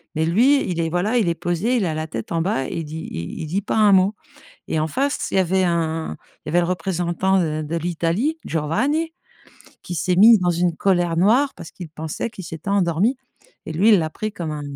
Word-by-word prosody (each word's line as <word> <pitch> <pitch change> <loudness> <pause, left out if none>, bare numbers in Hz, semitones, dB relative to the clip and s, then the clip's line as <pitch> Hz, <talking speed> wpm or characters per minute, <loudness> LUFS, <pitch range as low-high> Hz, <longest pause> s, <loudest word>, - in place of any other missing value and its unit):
mais 160 - +1
lui, 250 - +4
il 170 -1 -2
est 165 - -1
voilà, 200 +8 0
il 210 -7 +2
est 170 - 0
posé, 175 +10 -1
il 200 - +1
a 160 - -1
la 155 0 -3
tête 115 0 -6
en 165 -1 0
bas 165 -8 -1
et - - -6
il 160 - -4
dit 160 +2 -7
i 85 - -6
il - - -5
dit 185 +6 -1
pas - - -3
un 210 -2 +5
mot, 190 +3 +4 0.5
et 160 - 0
en 155 - 0
face, 280 - -1
il - - -1
y - - +5
avait 190 +1 +2
un 165 - -1 0.3
il - - -8
y - - -2
avait 175 +2 +3
le 170 - 0
représentant 180 +1 0
de 155 -2 -1
de 160 +3 -3
l'Italie, 175 - -1
Giovanni, 265 - 0 0.7
qui 175 - -5
s'est 180 +4 0
mis 220 +4 +8
dans 180 -1 +1
une 175 0 0
colère 175 -3 +1
noire 240 +10 +3
parce 165 - -10
qu'il 175 -4 -9
pensait 160 +7 -5
qu'il 190 - -10
s'était 165 +4 -7
endormi, 200 +6 +1 0.5
et 160 - -5
lui, 195 +8 +3
il 205 -5 +6
l'a 160 -1 -1
pris 215 +5 -4
comme 165 -3 -4
un 150 - -5
175 Hz, 240 wpm, -21 LUFS, 160-205 Hz, 0.7 s, mis